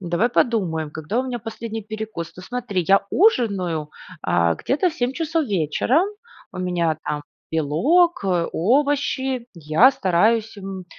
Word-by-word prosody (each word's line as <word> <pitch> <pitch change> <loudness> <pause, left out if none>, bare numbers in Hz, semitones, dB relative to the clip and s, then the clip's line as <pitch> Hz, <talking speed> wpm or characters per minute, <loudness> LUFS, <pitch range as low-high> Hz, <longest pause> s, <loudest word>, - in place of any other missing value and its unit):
давай 180 +6 +1
подумаем, 180 -11 0
когда 160 +9 -3
у - - -3
меня 250 -2 -3
последний 225 0 -6
перекус? 215 -5 -6
Ну 180 - -10
смотри, 210 -6 -3
я 195 0 +4
ужинаю, 195 - +2 0.3
а, 85 -1 +2
где-то 330 +7 0
в - - -12
7:00 250 -3 -1
часов 325 +1 -1
вечера, 200 - +1 0.5
у - - -8
меня 175 -3 0
там 150 0 -3 0.3
белок, 255 - +2
э, 180 -3 +1
овощи. 265 - +1
Я 165 - +4
стараюсь, 220 +2 +1
м, 190 -2 -7
205 Hz, 140 wpm, -22 LUFS, 170-250 Hz, 0.5 s, я